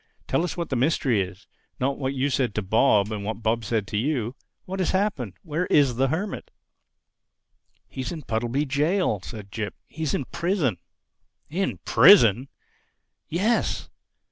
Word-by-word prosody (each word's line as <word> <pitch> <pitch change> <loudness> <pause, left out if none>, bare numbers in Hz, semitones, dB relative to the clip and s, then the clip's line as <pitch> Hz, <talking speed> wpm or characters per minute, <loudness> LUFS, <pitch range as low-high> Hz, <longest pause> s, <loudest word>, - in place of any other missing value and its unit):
"Tell 165 - +1
us 180 - -3
what 170 -1 -3
the 135 - -1
mystery 130 -4 +2
is—not 100 +8 -5
what 135 0 -2
you 135 +2 0
said 125 -5 0
to 110 - -1
Bob 105 0 +3
and 105 -2 -4
what 110 +2 -4
Bob 115 +1 +1
said 110 -1 -1
to 105 - -2
you. 125 -1 -1 0.3
What 190 +1 -5
has 185 - +1
happened? 185 - -1
Where 165 +2 -2
is 140 -5 +4
the 135 +1 +3
Hermit?" 175 +8 -3 1.4
"He's 130 -1 -5
in 160 -3 -6
Puddleby 120 +5 -1
Jail," 150 - +1
said 105 -1 -9
Jip. 110 -1 -4
"He's 160 -3 -3
in 135 - -2
prison." 170 - 0 0.7
"In 190 +4 -1
prison!" 125 - +6 0.8
"Yes." 205 +8 0
130 Hz, 150 wpm, -25 LUFS, 110-160 Hz, 1.4 s, prison